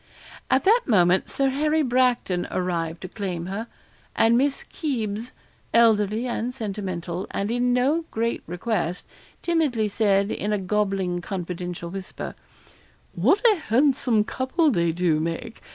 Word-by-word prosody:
At 260 - +3
that 455 +5 +5
moment 185 -5 +3
Sir 275 -1 +1
Harry 305 +3 +1
Bracton 245 -8 +1
arrived 170 -2 -2
to - - -4
claim 180 -4 -4
her, 200 +5 -4 0.5
and 225 +1 +4
Miss 275 +3 +1
Kybes 235 -6 -3 0.4
elderly 220 -1 +4
and 245 0 -3
sentimental, 190 -5 -4
and 200 +2 -2
in 245 +1 +1
no 275 +7 +2
great 230 +1 -1
request 180 -1 -2 0.4
timidly 295 -11 +1
said, 200 -1 +2
in 210 - -2
a 210 - +2
gobbling, 195 -2 -1
confidential 175 -2 -5
whisper 190 0 -6 0.8
'What 410 +6 +2
a - - -4
handsome 255 -5 +2
couple 270 +8 +1
they 170 -6 +1
do 165 -2 +1
make! 165 +7 -4
215 Hz, 135 wpm, -24 LUFS, 180-250 Hz, 0.8 s, that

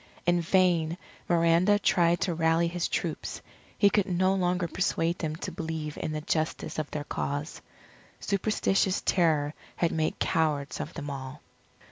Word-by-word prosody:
In 175 0 +3
vain 170 -2 +2 0.3
Miranda 170 +4 +4
tried 175 -4 +2
to 180 - +1
rally 165 +1 +2
his 170 0 -1
troops, - - -3 0.4
he 200 -1 +5
could 205 -1 +2
no 185 +1 +2
longer 180 -2 0
persuade 170 -1 0
them 155 -2 -2
to - - -5
believe 160 -2 -4
in - - -3
the 155 0 -3
justice 155 -1 -2
of 155 - -3
their 150 - -4
cause. 145 +1 -4 0.6
Superstitious 195 -1 +1
terror 155 -5 +2 0.2
had 170 - +1
made 155 -1 -1
cowards 150 -3 0
of 155 - -6
them 145 -3 -5
all. 135 +1 -7
165 Hz, 150 wpm, -28 LUFS, 155-180 Hz, 0.6 s, he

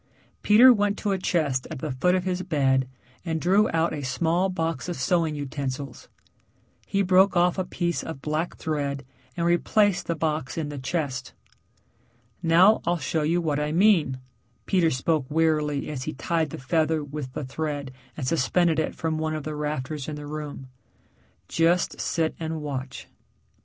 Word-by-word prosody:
Peter 240 +5 +8
went 205 -2 0
to 205 - -1
a 195 - +1
chest 150 -8 0
at 160 - -5
the 145 +3 -4
foot 160 +9 +2
of 185 - 0
his 185 -1 -1
bed 135 -7 +1 0.4
and 160 -2 -2
drew 195 +6 +3
out 165 +1 +1
a 150 - -4
small 165 +8 0
box 165 -1 -2
of 175 - -2
sewing 160 +3 +1
utensils. 140 -2 -5 0.8
He 200 0 +1
broke 185 0 +4
off 175 +2 +3
a - - +1
piece 175 -1 -2
of 160 -4 -7
black 155 +4 -2
thread 140 -3 -3 0.3
and 170 - 0
replaced 190 +3 +2
the 170 - 0
box 155 -4 -2
in 155 -3 -2
the 145 -1 -6
chest. 135 -2 -3 1.1
"Now 180 +5 +5
I'll 175 +1 +1
show 160 0 -1
you 165 +4 +1
what 150 -3 0
I 150 0 -1
mean," 170 -7 +3 0.5
Peter 180 -4 +3
spoke 145 0 0
wearily 150 -2 +1
as 140 -4 -5
he 155 - -3
tied 160 +3 -1
the - - -7
feather 155 +3 0
with 145 -2 -6
the 145 - -4
thread 145 -1 -4 0.3
and 140 - -3
suspended 165 +3 +2
it - - -1
from 160 -1 -2
one 155 0 -1
of 155 - -4
the 155 - -4
rafters 150 -1 -3
in 155 - -4
the 150 0 -8
room. 145 -2 -6 0.8
"Just 170 +2 +1
sit 160 -2 0
and 160 -1 -3
watch." 135 -3 -5
160 Hz, 175 wpm, -25 LUFS, 145-175 Hz, 1.1 s, Peter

